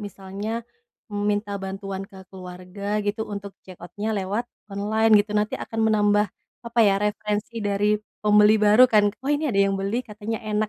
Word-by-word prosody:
misalnya, 205 +3 -5 0.5
mmm, 205 - -2
minta 205 0 -1
bantuan 195 0 -5
ke 195 - -15 0.2
keluarga 185 +1 -9 0.2
gitu, 210 +2 -2
untuk 200 -1 -6
check 185 -1 -13
out-nya 205 +6 -6
lewat 200 +4 -2 0.3
online 215 +3 +1
gitu, 210 0 -5
nanti 210 0 0
akan 225 0 -4
menambah, 205 0 +3 0.4
apa 235 0 -4
ya, 195 - +3
referensi 210 +2 -2
dari 205 0 +1 0.3
pembeli 210 +1 +6
baru 210 +3 +6
kan, 215 -3 +4 0.2
"Oh 270 - -4
ini 295 +1 +1
ada 195 - +3
yang 195 - 0
beli 200 +5 -1
katanya 215 0 -5
enak," 210 0 0
205 Hz, 170 wpm, -24 LUFS, 200-215 Hz, 0.5 s, pembeli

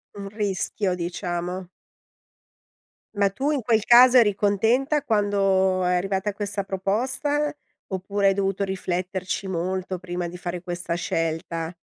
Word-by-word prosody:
Un 200 -1 -6
rischio 200 -1 -1
diciamo. 175 +1 -4 1.5
Ma 200 -1 +3
tu 270 +9 -1
in 290 -3 0
quel 225 -2 +2
caso 245 +2 +8
eri 215 -4 +5
contenta 225 +9 +1
quando 195 -5 +2
è 180 0 +2
arrivata 195 +2 -1
questa 200 0 -3
proposta, 260 +11 -1 0.3
oppure 195 +1 0
hai - - +3
dovuto 195 0 -1
rifletterci 185 0 -3
molto 185 +1 -2
prima 175 -1 -4
di 170 - -9
fare 175 0 -5
questa 175 -1 -3
scelta? 165 0 -2
195 Hz, 125 wpm, -24 LUFS, 180-205 Hz, 1.5 s, caso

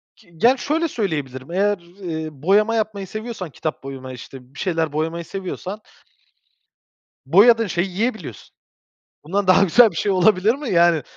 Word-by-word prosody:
Ki 170 - -23
ge 230 - +4
ya, 260 +2 +4
şöyle 320 +6 -1
söyleyebilirim, 145 - -4
eğer, 205 +3 +1
eee, 170 -2 -7
boyama 200 +10 +2
yapmayı 210 -3 -2
seviyorsan, 215 -4 -6
kitap 155 +1 -5
boyama 130 -1 -8
işte 125 +1 -12
bir 145 - -12
şeyler 165 -4 -1
boyamayı 165 +2 -2
seviyorsan 195 +2 -6 1.4
boyadığın 225 - +5
şeyi 175 +1 -1
yiyebiliyorsun. 190 - -4 0.7
Bundan 195 +5 -1
daha 185 +1 +5
güzel 225 +5 +6
bir - - -12
şey 200 - 0
olabilir 190 +3 +3
mi, 280 -2 -6
yani, 170 -3 +4
185 Hz, 150 wpm, -21 LUFS, 160-215 Hz, 1.4 s, güzel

